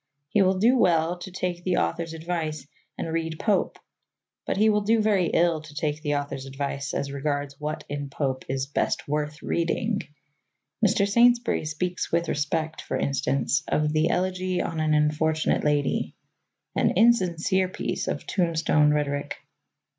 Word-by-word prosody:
He 210 - +3
will 190 0 +3
do 240 +6 +4
well 170 -1 +2
to 185 - -7
take 180 -1 -3
the 185 0 +1
author's 160 - -1
advice 160 -3 -3 0.3
and - - -3
read 165 -1 -2
Pope, 210 -3 +1 0.7
but - - -1
he 215 +2 +4
will 210 -1 +3
do 220 +3 +2
very 205 -5 +2
ill 165 -2 +2
to 155 -1 -13
take 150 0 -2
the 145 -2 0
author's 140 -2 -4
advice 140 0 -4
as 140 - -2
regards 145 0 -3
what 150 +1 -4
in 145 -1 -4
Pope 135 -2 -2
is 135 0 -1
best 140 - -1
worth 150 +1 -2
reading. 200 +6 0 0.8
Mr. 200 -1 +3
Saintsbury 240 -2 +3
speaks 175 +4 -3
with 170 0 +1
respect, 155 +2 -1
for - - -3
instance, 140 0 0
of 150 0 +1
the 155 +1 +2
Elegy 185 0 0
on 165 -1 -2
an 155 -1 +2
Unfortunate 155 +1 +1
Lady 145 -2 0 0.6
an - - +2
insincere 190 -4 +3
piece - - -3
of - - -3
tombstone 160 -4 +2
rhetoric. 145 -1 -1
160 Hz, 155 wpm, -26 LUFS, 145-185 Hz, 0.8 s, do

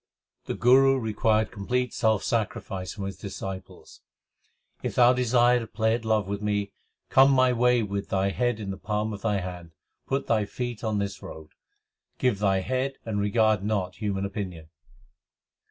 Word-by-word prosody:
The - - -3
Guru 135 +2 +5
required 110 -2 +1
complete 125 +5 -2
self 110 -3 +1
sacrifice 95 -4 -2
from 100 - -5
his 95 -1 -6
disciples: 95 -1 -8 0.8
If - - -4
thou 125 0 +6
desire 125 0 +3
to 115 - -6
play 110 +2 0
at 115 -1 -3
love 110 -3 +1
with 100 +1 -3
me, 105 -1 -1 0.4
Come 135 +1 +7
my 130 -1 +4
way 125 0 +3
with 100 -1 -4
thy 95 0 +1
head 120 0 0
in 100 -2 -4
the 95 - -6
palm 105 +1 -2
of 100 - -7
thy 105 -3 0
hand. 90 -2 -8 0.3
Put 135 +1 -1
thy 110 -2 +1
feet 120 +1 -5
on 110 -2 0
this 100 -1 -3
road; 80 -5 -10 0.7
Give 125 -6 +1
thy 95 -2 +2
head 130 +5 -1
and 110 -3 -2
regard 110 -1 +2
not 100 -4 -2
human 100 -2 -2
opinion. 90 -6 -6
105 Hz, 170 wpm, -26 LUFS, 100-120 Hz, 0.8 s, Come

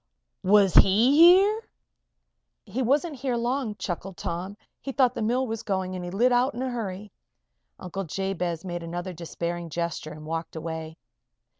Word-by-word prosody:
"Was 195 -1 +4
he 225 +8 +6
here?" 380 +7 +6 1.0
"He 225 +5 -3
wasn't 285 +5 +1
here 255 -1 -1
long," 240 -2 -1
chuckled 190 -1 -5
Tom. 185 +4 -4 0.2
"He 275 - -4
thought 255 -2 +3
the - - -4
mill 245 +4 +1
was 225 -2 -4
going 190 -4 -2
and 180 - -5
he 175 - -5
lit 235 +8 +2
out 245 +1 +2
in 250 - -3
a 260 - -2
hurry." 210 -3 -5 0.7
Uncle 195 +1 -5
Jabez 180 -1 -3
made 175 -1 -4
another 175 +2 -5
despairing 170 0 -5
gesture 170 -1 -3
and 155 0 -10
walked 165 +1 -4
away. 160 0 -6
195 Hz, 160 wpm, -26 LUFS, 175-245 Hz, 1.0 s, he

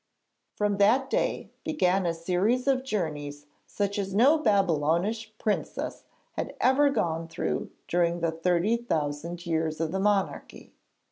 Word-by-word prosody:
From 205 -1 0
that 245 +7 +3
day - - -1
began 190 - +1
a 170 - +1
series 185 +9 0
of 265 -2 +2
journeys 150 - -3 0.2
such 200 0 -2
as 195 -1 -3
no 275 +9 +5
Babylonish 195 - +1
princess 215 -1 -3 0.3
had - - -5
ever 275 +3 +4
gone 165 -10 -1
through 165 - -3 0.2
during 175 0 +1
the 165 -1 0
thirty 175 +6 +1
thousand 170 -4 -3
years 160 -2 -1
of 165 -1 -1
the 190 - -1
monarchy. 200 -1 -1
190 Hz, 135 wpm, -27 LUFS, 165-220 Hz, 0.3 s, no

